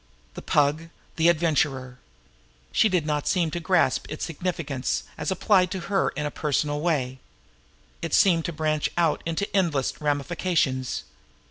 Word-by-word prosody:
The - - -8
Pug 150 +3 +1 0.3
the 165 +1 +4
Adventurer! 145 -6 0 0.7
She 220 - +4
did 180 -5 +1
not 150 -1 0
quite - - -9
seem 170 -4 +1
to 175 - -3
grasp 170 -5 +2
its 155 - -4
significance 160 -5 -2
as 150 - -3
applied 190 0 +3
to 190 - -4
her 195 - +3
in 150 - -1
a 150 - -2
personal 145 0 -1
way. 135 -6 -1 0.8
It 165 - 0
seemed 170 -4 +4
to - - -2
branch 155 -1 0
out 165 -3 +2
into 165 +5 -1
endless 160 -10 0
ramifications. 145 -2 0
155 Hz, 150 wpm, -25 LUFS, 145-175 Hz, 0.8 s, the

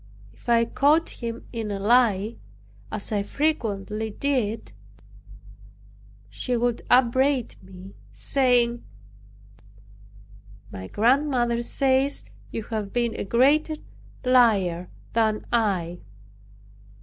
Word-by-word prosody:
If 115 - -11
I 230 -1 +4
caught 295 +7 +2
him 230 0 -5
in 225 -2 -3
a 200 -1 -3
lie, 220 -1 +2 0.5
as 215 0 -5
I 205 -2 +1
frequently 220 -5 -2
did, 230 -2 -1 1.6
he 240 - -1
would 240 0 0
upbraid 260 +1 +3
me, 190 +1 -12 0.2
saying, 245 -3 +1 1.9
"My 95 0 -7
grandmother 240 - +2
says 270 +2 +1 0.3
you 225 - -5
have 210 -3 -4
been 240 -1 0
a - - -3
greater 280 +9 +3 0.5
liar 200 -9 +3 0.2
than 220 -2 +1
I." 185 -7 0
235 Hz, 95 wpm, -25 LUFS, 205-255 Hz, 1.9 s, I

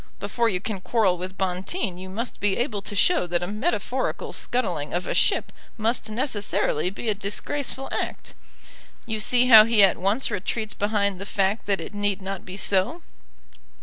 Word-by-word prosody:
Before 225 +4 0
you 185 -4 0
can 200 -1 -4
quarrel 205 -4 +2
with 185 +2 -6
Bonteen 190 - -2
you 185 +1 -9
must 230 +6 -5
be 200 -1 +1
able 235 -5 -1
to 205 - -4
show 205 - +3
that 175 0 0
a - - -3
metaphorical 215 - -2
scuttling 175 - -2
of 180 - -1
a - - -2
ship - - +2 0.3
must 225 +1 -1
necessarily 215 - 0
be 200 +4 -7
a 215 - +3
disgraceful 260 +7 -3
act. - - -4 0.7
You 220 -2 -3
see 245 +3 +3
how 220 -3 +11
he 225 -3 +5
at 195 - +5
once 205 +8 +1
retreats 210 +2 -2
behind 200 -2 0
the - - -4
fact 200 +2 0
that 200 -1 +1
it - - -7
need 205 -1 0
not 195 -1 -6
be 185 +1 -7
so." 205 - 0
205 Hz, 180 wpm, -25 LUFS, 190-225 Hz, 0.7 s, how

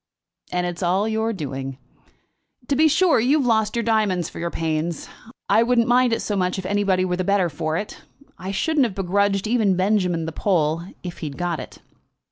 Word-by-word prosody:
"And 180 0 0
it 175 -1 -4
is - - -9
all 185 +4 +1
your 220 +1 0
doing. 135 - -5 0.9
To 280 - +2
be 315 +3 +5
sure 325 +1 +3
you 260 +7 +3
have 280 - 0
lost 220 -2 +1
your 235 - 0
diamonds 210 -6 +1
for - - -10
your 170 0 -2
pains. 160 0 -2 0.4
I 225 - +4
wouldn't 235 0 +2
mind 245 0 +4
it 230 - 0
so 210 - -2
much 180 -1 0
if 190 - -5
anybody 195 -2 +1
were 180 -1 -1
the 185 - -1
better 195 -2 +2
for 155 +1 -2
it. 205 - -6 0.3
I 185 +2 -7
shouldn't 285 +8 +1
have 195 - -9
begrudged 195 +1 +1
even 215 -4 +2
Benjamin 185 -3 +1
the 160 - -4
pull, 165 -3 0 0.2
if 175 -2 -7
he'd 145 -4 -6
got 175 -2 -2
it." - - -10
195 Hz, 205 wpm, -22 LUFS, 175-220 Hz, 0.9 s, be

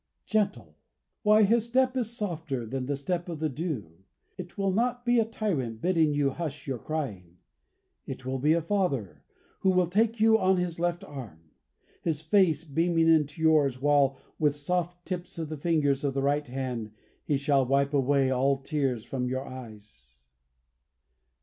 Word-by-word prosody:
Gentle! 120 - -1 0.4
Why, 215 +1 +5
His 225 +2 +3
step 255 +1 +2
is 235 -2 -2
softer 160 - -3
than 130 +2 -4
the 145 - 0
step 175 +5 -3
of 165 -3 -5
the 155 0 0
dew. 130 - -5 0.4
It 180 +1 -9
will 195 -1 +1
not 245 +4 0
be 240 0 +4
a 225 - +3
tyrant 155 - -2
bidding 165 0 +2
you 145 -1 +1
hush 150 -1 -5
your 130 -3 -3
crying. 100 - -5 0.7
It 130 -1 -7
will 130 0 -2
be 150 +4 +3
a 165 -1 +1
Father 155 - -1 0.4
who 190 - +2
will 180 -1 +4
take 220 +6 +1
you 220 0 +5
on 190 -1 +3
His 175 -2 -2
left 175 +2 -1
arm, 105 - -10 0.5
His 160 -3 -1
face 160 -1 +3
beaming 165 +2 +2
into 155 0 +2
yours, 145 -5 +3
while 140 -1 +3 0.2
with 150 -3 +3
the - - -9
soft 175 +3 -2
tips 180 -2 -5
of 160 -2 -4
the 155 - -5
fingers 145 -3 +1
of 140 -2 -1
the 135 - 0
right 145 +1 +1
hand 125 -4 -4 0.3
He 145 - +1
shall 140 -1 +2
wipe 140 +2 +1
away 135 -1 +2
all 135 +2 +2
tears 135 -4 -2
from 125 -2 -3
your 130 +1 -3
eyes." 105 - -12
150 Hz, 175 wpm, -28 LUFS, 130-180 Hz, 0.7 s, Why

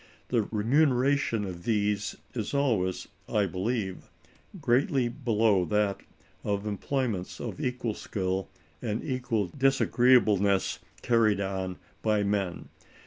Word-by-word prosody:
The 120 -2 +3
remuneration 125 0 +2
of 90 -2 -7
these 105 -2 0 0.2
is 115 +3 -3
always, 110 -10 +1 0.2
I 105 -2 +2
believe, 95 +2 -3 0.5
greatly 130 -2 +2
below 115 -6 +2
that 105 +2 0 0.4
of 100 0 -1
employments 105 -2 -2
of - - -5
equal 125 -3 -1
skill 95 -2 -3 0.3
and 105 +1 -2
equal 115 -7 -1
disagreeableness 120 -7 +3 0.2
carried 115 -4 +3
on 95 -2 -3 0.2
by 105 -2 +2
men. 100 -3 -2
105 Hz, 105 wpm, -28 LUFS, 100-125 Hz, 0.5 s, The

